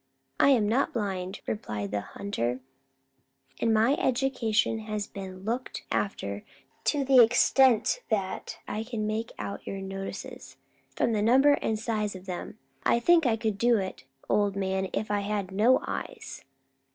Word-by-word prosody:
"I - - +6
am 235 -7 +4
not 245 +6 +1
blind," 190 -4 -3
replied 105 - -4
the 105 -1 -1
hunter; 125 - -3 1.0
"and 230 - +2
my 220 +4 +4
education 240 -4 +1
has 215 -1 -3
been 190 -2 -8
looked 240 +4 -3
after 100 - -2 0.4
to 285 -3 +1
the 260 -2 +7
extent 250 - +4
that 195 -4 -2
I 215 - -3
can 225 -2 -3
make 220 +2 -2
out 200 - -6
your 195 - -4
notices. 195 0 -7 0.4
From - - +1
the 210 - +1
number 260 +6 +5
and 220 -6 0
size 215 -2 -2
of 185 0 -10
them, 180 -2 -6 0.3
I 235 - +3
think 330 +3 +4
I 225 -2 +2
could 215 -3 -2
do 235 +1 +4
it, 190 -9 -5 0.2
old 205 -1 +2
man, 190 -1 -1
if 215 - -2
I 205 - +2
had 200 -2 -2
no 220 +7 +4
eyes." 445 -3 -6
215 Hz, 155 wpm, -28 LUFS, 195-235 Hz, 1.0 s, the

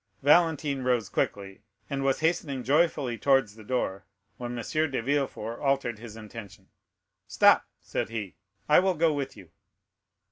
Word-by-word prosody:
Valentine 150 -2 +3
rose 125 -5 0
quickly, 100 -1 -3 0.3
and 135 -1 -3
was 135 +2 +1
hastening 160 -5 0
joyfully 140 -5 +1
towards 135 -4 +3
the 110 - -13
door, 105 -4 -2 0.3
when 120 0 -5
M. 120 - -4 0.3
de 135 - -2
Villefort 120 -3 -2
altered 135 -5 0
his 115 -2 -10
intention. 105 -3 -11 0.6
"Stop," - - +4
said - - -3
he; 105 -8 -5 0.3
"I 150 - +6
will 185 0 +1
go 160 0 +2
with 140 -4 -4
you." 90 -5 -14
130 Hz, 145 wpm, -27 LUFS, 110-145 Hz, 0.6 s, I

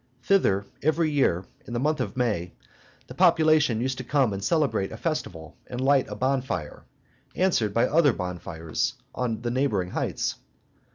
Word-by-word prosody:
Thither, 100 - +2 0.2
every 155 +1 +1
year, 95 - +1 0.2
in 120 - -7
the 120 - 0
month 150 +3 +1
of 130 - -4
May, 105 -9 -1 0.5
the - - -10
population 155 -8 +4
used 130 +1 -2
to - - -4
come 130 -4 +1
and 95 0 -5
celebrate 150 - +1
a - - -7
festival 90 - -4
and 125 - -6
light 135 0 +3
a - - -5
bonfire, 130 - -2 0.5
answered 130 - +2
by 115 +3 +3
other 155 -2 +4
bonfires 85 -5 -3 0.2
on 120 -2 -2
the 120 - -1
neighboring 110 -9 0
heights. - - -2
125 Hz, 160 wpm, -26 LUFS, 100-150 Hz, 0.5 s, population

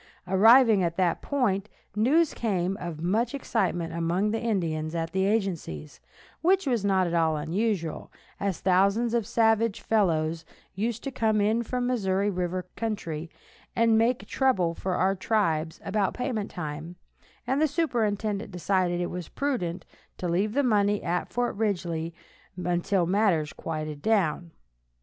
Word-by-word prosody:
Arriving 220 +3 +6
at 170 -1 -1
that 180 -3 +1
point, 215 -8 0 0.3
news 285 +10 +3
came 190 -4 -1
of 170 -3 -5
much 225 +8 +1
excitement 175 -10 -1
among 170 +5 0
the 225 - -2
Indians 165 -8 -1
at 165 -1 -2
the 190 0 +1
agencies, 175 - -2 0.4
which 380 +2 +3
was 240 -6 0
not 190 -2 +2
at 170 - -2
all 160 -2 +2
unusual, 170 +1 -2 0.3
as 200 -4 -2
thousands 200 +5 +2
of 230 -3 0
savage 225 -2 +2
fellows 165 -6 +1 0.3
used 225 +4 -2
to 275 - -3
come 220 -4 +1
in 215 +3 +2
from 250 +2 -2
the 250 - +1
Missouri 200 -2 0
river 180 0 -2
country, 170 -8 -4 0.5
and 230 -1 +4
make 235 +3 +2
trouble 190 -11 +1
for 185 +2 -3
our 190 +2 +2
tribes 170 -6 0
about 200 -1 0
payment 250 -5 -2
time, 155 +1 -6 0.5
and 265 +4 0
the 310 - +4
superintendent 220 - -1
decided 180 -1 0
it 175 - -2
was 180 -1 -6
prudent 215 -12 -2 0.3
to 180 - -3
leave 195 +5 0
the 285 - +2
money 205 -4 +2
at 175 +1 -1
Fort 245 0 -1
Ridgely 175 -6 -1 0.5
until 175 +1 0
matters 180 -5 +1
quieted 155 -2 -5
down. 175 -5 +1
195 Hz, 150 wpm, -27 LUFS, 170-225 Hz, 0.5 s, Arriving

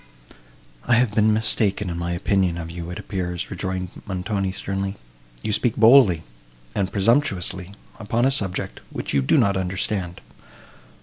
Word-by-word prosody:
"I 120 - +5
have 120 -3 +2
been 110 0 +4
mistaken 105 -2 +1
in 85 - -3
my 85 0 -2
opinion 90 0 +1
of 85 -1 -6
you, 85 0 -6
it 90 - -6
appears," 90 -3 -4
rejoined 95 -1 -3 0.2
Montoni, 95 0 -2
sternly. 95 +1 -3 0.5
"You 105 - -1
speak 120 +1 +1
boldly, 110 - +6 0.5
and 95 -2 -1
presumptuously, 100 -4 +1 0.3
upon 115 +3 0
a 135 - +4
subject, 95 -8 -2
which - - -4
you 70 - +3
do 65 - +3
not 100 -1 +3
understand. 90 -1 -2
95 Hz, 145 wpm, -23 LUFS, 90-110 Hz, 0.5 s, boldly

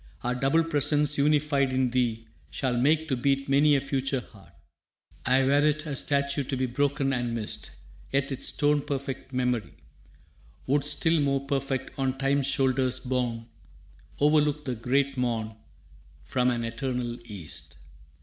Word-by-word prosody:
Our 125 - 0
double 135 +6 +2
presence 150 -2 +1
unified 145 -2 +2
in 130 -1 +1
thee 115 -3 0 0.2
Shall 130 -3 -1
make 150 +6 +2
to 130 - +1
beat 135 +2 0
many 145 +2 +4
a 135 - +2
future 135 -1 -1
heart. 100 -6 -17 0.8
Ay, 130 +1 +4
were't 145 +3 +2
a 150 -3 -3
statue 140 0 0
to 135 0 -3
be 130 - +1
broken 135 +2 0
and 120 -2 -1
missed, 110 -2 -4 0.4
Yet 135 0 0
its 135 - -2
stone 145 0 +2
perfect 135 -2 -5
memory 125 -6 -1 0.9
Would, 140 +1 +1
still 155 +3 +2
more 140 -1 0
perfect, 135 -1 -2
on 135 -1 0
Time's 135 0 +1
shoulders 130 -2 +2
borne, 125 -3 -2 0.7
Overlook 150 0 +3
the 130 - -1
great 135 +4 0
Morn 115 -3 -1 0.7
From 125 -1 +1
an 120 -1 -1
eternal 120 0 -3
East. 100 -9 -9
135 Hz, 145 wpm, -27 LUFS, 125-145 Hz, 0.9 s, many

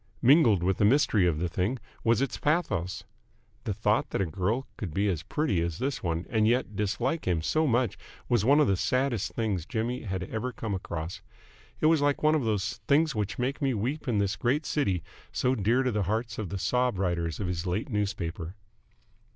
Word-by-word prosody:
Mingled 120 - +5
with 95 +1 +1
the - - +1
mystery 110 -5 +4
of 80 -3 +1
the 90 +3 -1
thing 95 +9 -1 0.3
was 115 +2 +3
its 135 - -3
pathos. 100 - 0 0.6
The - - -1
thought - - +1
that - - -2
a 100 - +2
girl 95 - -1
could 85 -7 -6
be 100 +1 +2
as 85 -5 -1
pretty 105 - 0
as 85 -1 -2
this 135 +1 -2
one 85 0 -2
and 110 -2 +3
yet 120 -3 +1
dislike 120 - -1
him 85 -3 +1
so 155 - +2
much 120 -4 +1 0.3
was 120 -5 +2
one 140 +6 +5
of 150 - +5
the 100 - +2
saddest 130 -1 0
things 100 -8 -1
Jimmy 120 +3 -2
had 95 -4 -3
ever 110 +6 -3
come 110 -4 -4
across. 85 -3 -5 0.6
It - - +2
was 160 -1 +5
like 145 0 +1
one 155 0 +5
of 155 -4 +1
those 105 -2 -1
Things 150 +1 +3
Which 105 +1 -2
Make 130 +4 -2
Me 135 -3 +1
Weep 135 +9 -3
In 115 -4 +1
This 100 -1 +1
Great 140 +6 0
City 95 - 0 0.3
so 125 - +1
dear 120 +3 +2
to 130 - +1
the 105 -1 0
hearts 110 +5 -2
of 105 -5 -3
the 100 - -3
sob 125 +2 +1
writers 85 -3 -1
of 100 - -2
his 90 0 -3
late 95 +9 -2
newspaper. 90 -4 -3
110 Hz, 210 wpm, -28 LUFS, 95-130 Hz, 0.6 s, Mingled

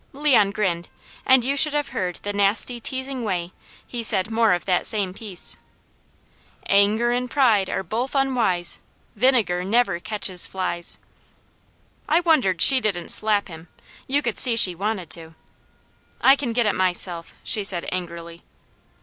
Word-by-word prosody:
Leon 270 -8 +2
grinned 185 -5 -3 0.4
and 260 -2 +4
you 275 +2 -1
should 295 +1 +2
have 295 -1 -2
heard 180 -1 -4
the 205 - -4
nasty, 205 +4 +3
teasing 260 +1 -5
way 180 -4 -4 0.3
he 240 - -7
said 215 -1 +3
more 225 -3 +2
of 175 - -4
that 180 -2 +1
same 200 -4 +1
piece: 195 -3 +2 1.1
"Anger 210 +4 +1
and 250 +1 -3
pride 230 -8 +1
are - - -4
both 235 - -5
unwise, 240 -10 0 0.4
Vinegar 230 -9 0
never 225 -1 0
catches 190 -2 0
flies 180 -2 -4 0.6
" - - -28
I - - +5
wondered 260 - +1
she 265 -2 +7
didn't 190 -6 -3
slap 210 -2 +2
him. 165 -2 -13 0.4
You 285 +2 -1
could 235 - -3
see 245 -3 +5
she 190 -5 +3
wanted 195 -1 -5
to. 165 -1 -8 0.8
"I 270 - +5
can 270 -4 -5
get 235 0 -1
it 210 - 0
myself," 180 -2 +2
she 215 -3 -3
said 185 -3 +1
angrily. 170 -2 -8
210 Hz, 155 wpm, -21 LUFS, 180-245 Hz, 1.1 s, she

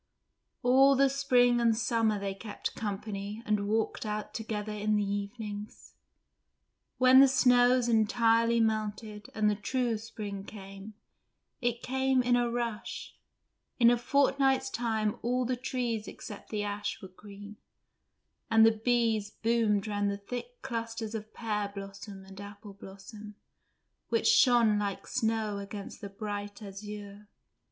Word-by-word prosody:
All 270 +3 +6
the 275 0 +4
spring 245 -3 +3
and 230 -2 +3
summer 225 -2 +1
they 195 -1 -3
kept 205 +2 -6
company 205 0 -5
and 210 -1 0
walked 220 +1 -1
out 210 -1 -4
together 215 -1 -4
in 210 0 0
the 210 - +2
evenings. 205 +1 -6 1.0
When 255 +1 +7
the 275 - +9
snows 250 -1 +4
entirely 230 +1 +3
melted 215 -1 -2
and 215 0 +2
the 210 - +3
true 230 +2 -1
spring 210 -3 -7
came, 195 +1 -10 0.7
it 240 -1 -1
came 265 0 +1
with 245 0 +2
a 240 -1 +1
rush; 235 -2 -4 0.6
in 235 -1 +6
a - - +4
fortnight's 270 +1 +2
time 220 -3 -1
all 250 +2 0
the 255 +1 0
trees 245 -3 -3
except 205 - -9
the 210 -1 -2
ash 205 0 -3
were - - -6
green, 205 +2 -12 0.9
and 225 0 +6
the 225 - +6
bees 230 -4 +2
boomed 220 -2 +1
round 205 -1 -1
the 200 - -2
thick 245 - -8
clusters 230 -3 -4
of 215 -1 -6
pear 210 -3 -3
blossom 195 0 -9
and 195 +1 -11
apple 205 0 -10
blossom, 200 +2 -11 0.7
which 455 - +1
shone 240 - +5
like 200 -2 -3
snow 220 -2 -1
against 200 0 -8
the 200 - -6
bright 205 0 -6
azure. 205 +1 -9
220 Hz, 140 wpm, -30 LUFS, 205-240 Hz, 1.0 s, the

